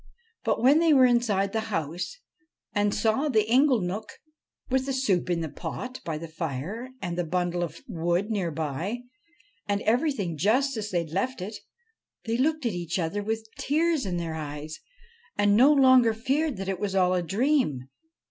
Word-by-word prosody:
But - - 0
when 280 +5 +6
they 330 -2 +4
were 260 -2 +7
inside 220 -5 +2
the 220 - +1
house, 170 - -3 0.6
and 205 0 +2
saw 220 +8 +1
the 215 -5 +3
inglenook, 220 -5 +2 0.6
with 265 +1 0
the 270 - -1
soup 205 -10 +1
in 170 -1 0
the 160 - -2
pot 255 - -6
by 160 -2 -3
the 165 +2 -7
fire 165 - -5
and 175 -1 -2
the 175 - -1
bundk 175 +1 -1
of 170 -2 -4
wood 175 +5 -1
near 195 -5 0
by, 160 - -3 0.7
and 205 0 0
everything 225 - 0
just 255 - +2
as 210 -1 -4
they 175 -3 0
had 160 -2 -8
left 250 +8 -1
it, 200 +4 -5 0.7
they 225 0 -1
looked 305 +2 +1
at 230 - 0
each 175 0 -3
other 180 +4 -1
with 220 +2 -3
tears 315 -3 +1
in 180 -2 -2
their 165 -2 -3
eyes 150 0 -6 0.6
and 205 0 +4
no 260 +7 +7
longer 260 -5 +5
feared 275 +4 0
that 195 0 -5
it 190 -2 -2
was 200 -1 -2
all 185 -1 +3
a. 180 - +1
dream. 195 - 0
205 Hz, 180 wpm, -27 LUFS, 175-255 Hz, 0.7 s, were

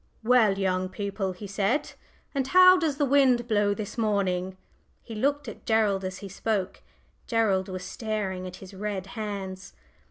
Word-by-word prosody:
"Well, 225 -4 +4
young 185 -1 0
people," 195 0 -3
he 180 +3 -9
said, 205 +9 -1 0.4
"and 270 -2 -1
how 365 +2 +8
does 320 -6 0
the 290 - +2
wind 260 -3 +3
blow 205 -2 +2
this 215 +2 -6
morning?" 190 -4 0 0.5
He 230 - -9
looked 280 +6 0
at - - -9
Gerald 215 -4 +2
as 185 0 -4
he - - -5
spoke. 200 0 -2 0.5
Gerald 200 -5 +1
was 185 -1 -5
staring 190 -2 -3
at 180 - -8
his 190 +1 -12
red 195 -1 -4
hands. 200 -4 -5
205 Hz, 160 wpm, -27 LUFS, 190-230 Hz, 0.5 s, how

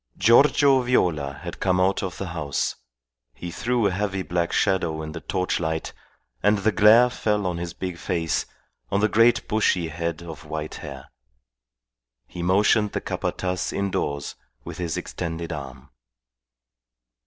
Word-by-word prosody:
Giorgio 135 +5 +5
Viola 85 - +1
had - - -7
come 90 -1 +1
out 95 +1 +2
of 95 -3 -4
the 95 - -4
house. 75 -6 -2 0.6
He 85 - -7
threw 120 +4 0
a 100 - +3
heavy 95 0 -2
black 85 -1 -1
shadow 85 -6 +1
in 75 - -6
the 80 - -6
torchlight, 85 -4 -2 0.5
and 105 +1 +3
the 105 +3 +1
glare 110 +3 +6
fell 105 -4 0
on 90 -2 -1
his 85 -1 -5
big 90 -3 -5
face, 85 -4 -1 0.4
on 100 - +1
the 105 - +4
great 115 +3 +3
bushy 95 -6 +1
head 85 0 -4
of 80 -3 -9
white 75 0 -5
hair. - - -9 1.1
He 85 - -8
motioned 100 +3 +3
the - - -2
Capataz 90 0 -2
indoors 75 -8 -2 0.3
with - - -8
his 85 -2 -2
extended 85 -1 -4
arm. 70 -4 -9
90 Hz, 145 wpm, -24 LUFS, 80-105 Hz, 1.1 s, glare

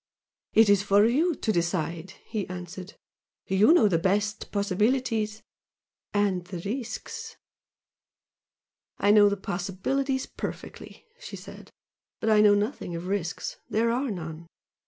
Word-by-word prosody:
"It 225 0 +6
is 200 -1 +5
for 200 +1 +4
you 305 +9 +2
to 225 - -1
decide" 170 0 -2
he 215 -4 -3
answered 180 +1 -8 0.5
"You 195 +8 +4
know 330 -11 +6
best 200 +4 +1
the - - -7
possibilities 215 +2 0 0.7
and 200 -3 +1
the 180 0 -6
risks 450 - -5 0.8
" - - -67 0.3
"I 205 - +3
know 205 -1 +7
the 200 - -2
possibilities 200 +10 -2
perfectly," - - -8
she - - -8
said - - -11 0.5
"But 220 - +1
I 210 -1 +6
know 205 -1 +6
nothing 205 -4 -2
of 170 +1 -5
risks 185 -2 -3
there 230 +2 +1
are 255 +3 -1
none. 165 -4 -6
205 Hz, 135 wpm, -27 LUFS, 185-225 Hz, 0.8 s, know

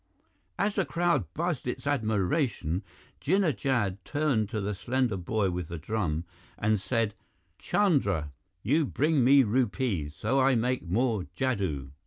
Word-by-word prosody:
As 205 +1 +1
the 195 - +1
crowd 175 0 0
buzzed 170 -6 -2
its 125 - -4
admiration, 110 - 0 0.4
Jinnah 180 -2 +2
Jad 105 -9 -1
turned 135 -8 0
to 110 -2 -2
the 105 +1 -2
slender 125 +2 0
boy 95 +1 0
with 90 -2 -4
the 85 - -6
drum 85 -2 -2 0.3
and 110 -1 +1
said, 115 0 0 0.5
"Chandra, 100 - +1 0.3
you 150 +9 +3
bring 150 0 +2
me 135 +2 +7
rupees, 105 - 0
so 130 +6 0
I 135 0 +4
make 125 +2 0
more 110 -1 +1
jadoo." 95 - -1
115 Hz, 140 wpm, -28 LUFS, 95-135 Hz, 0.5 s, me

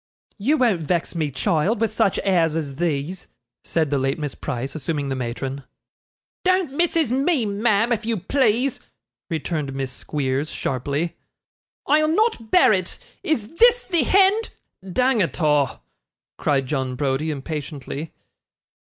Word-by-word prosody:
'You 280 +10 +2
won't 225 - +2
vex 170 +2 -1
me, 160 -4 -1
child, 160 - 0
with 225 -2 +1
such 215 -3 +1
airs 170 -5 +2
as 145 -4 -3
these,' 165 +2 -2 0.4
said 160 -4 0
the 140 - +2
late 135 +1 0
Miss 150 -3 -4
Price, 135 -1 -4
assuming 145 -1 -3
the 135 - -1
matron. 130 +2 -4 0.8
'Don't 370 -6 +2
MISSIS 330 -4 +1
me, 275 0 +2
ma'am, 215 +2 +1
if 225 0 -2
you 225 0 -1
please,' 250 +5 +1 0.5
returned 155 -4 -3
Miss 135 -1 -3
Squeers, 140 +1 -2
sharply. 145 +6 -2 0.7
'I'll 310 +1 +4
not 430 - +1
bear 355 -8 +6
it. 185 -2 -2 0.2
Is 240 -8 -1
THIS 485 +2 +5
the 345 -4 +1
hend 390 - +4 0.2
' 190 0 -13
'Dang 250 +2 +2
it 175 - -1
a',' 150 -6 +2 0.6
cried 135 -2 +1
John 130 -2 -2
Browdie, 140 +3 -1
impatiently. 150 0 -5
170 Hz, 145 wpm, -22 LUFS, -, 0.8 s, bear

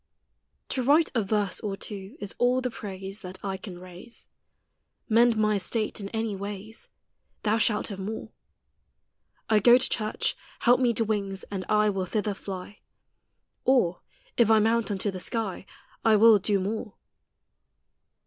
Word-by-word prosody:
To 260 - 0
write 295 +6 +4
a 235 - +2
verse 205 -1 0
or 200 -2 -4
two 195 -2 -7
is 205 -1 -4
all 245 +1 +3
the 250 -1 -2
praise 195 -1 -7
That 185 -1 -8
I 195 -1 -2
can 185 -1 -8
raise; 180 +6 -12 0.8
Mend 230 0 +4
my 215 -1 +2
estate 215 +3 -2
in 200 -1 -6
any 220 -1 -2
wayes, 205 +2 -7 0.5
Thou 215 +1 +2
shalt 215 0 +1
have 200 -2 -6
more. 210 +3 -5 1.2
I 215 -1 +4
go 240 +4 +7
to 255 - 0
church; 215 -1 0 0.3
help 245 +1 +5
me 250 -2 +3
to 225 - +1
wings, 200 -3 -2
and 190 -2 -4
I 210 0 +3
Will 190 -2 -2
thither 210 +1 -1
flie; 195 +1 -8 0.8
Or, 240 -10 +2 0.4
if 235 -3 +4
I 220 - +6
mount 225 0 +2
unto 200 0 -1
the 185 - -6
skie, 200 -2 -3 0.4
I 225 -1 +5
will 220 0 +7
do 200 +1 +1
more. 210 +2 -4
210 Hz, 160 wpm, -27 LUFS, 195-225 Hz, 1.2 s, go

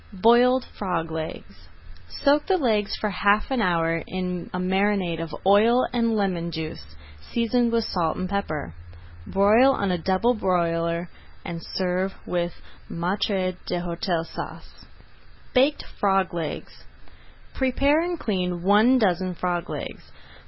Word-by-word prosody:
BROILED 240 +6 +4
FROG 170 -5 -2
LEGS 160 0 -7 0.4
Soak 290 +1 +2
the 380 -1 +3
legs 215 - +1
for 210 - -2
half 205 +5 +2
an 260 -3 +1
hour 165 -3 +1
in 180 -1 -4
a - - -3
marinade 185 -2 0
of 165 -2 -5
oil 220 +6 +5
and 230 -2 +1
lemon 185 -5 -1
juice, 155 - -7 0.4
seasoned 235 0 +1
with 230 -1 +2
salt 165 -6 -1
and 185 - -2
pepper. 155 - -3 0.5
Broil 215 +7 +5
on 200 -6 -1
a 180 - -1
double 190 +8 +2
broiler, 170 -4 0 0.4
and 170 -1 -5
serve 185 +1 -2
with 175 -1 -2 0.4
Maître 185 +1 -1
d'Hôtel 175 -1 -2
Sauce. - - -9 0.7
BAKED 275 +3 +3 0.2
FROG 195 -2 +2
LEGS 165 -3 -5 0.7
Prepare 275 +4 +2
and 345 -1 -3
clean 180 -4 -2
one 215 +7 +5
dozen 185 -4 +1
frog 175 0 -2
legs. - - -7
190 Hz, 130 wpm, -24 LUFS, 175-225 Hz, 0.7 s, oil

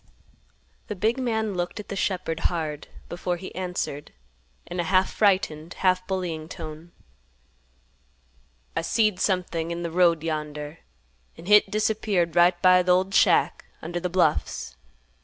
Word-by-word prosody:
The 210 - -4
big 220 +7 0
man 220 -4 -1
looked 175 +3 -3
at 210 - -9
the - - -4
shepherd 185 -4 -2
hard 155 -4 -4 0.2
before 175 0 -3
he 185 +2 -9
answered, 180 -5 -4 0.5
in 175 +1 -6
a - - +1
half 185 +2 +2
frightened, 180 -6 +1
half 185 -1 +1
bullying 170 -5 -3
tone, 160 -1 -9 1.8
"I - - 0
seed 215 +2 +1
something 175 -4 -1
in 170 0 -4
th' 170 -1 -4
road 170 -3 +3
yonder, 150 -1 -4 0.6
an' - - -12
hit 210 0 +5
disappeared 210 -5 0
right 175 0 +4
by 185 0 +7
th' 180 - -3
old 185 +2 +3
shack - - +3 0.2
under 175 +2 -3
th' 180 0 -3
bluffs." 155 - 0
180 Hz, 140 wpm, -25 LUFS, 165-190 Hz, 1.8 s, by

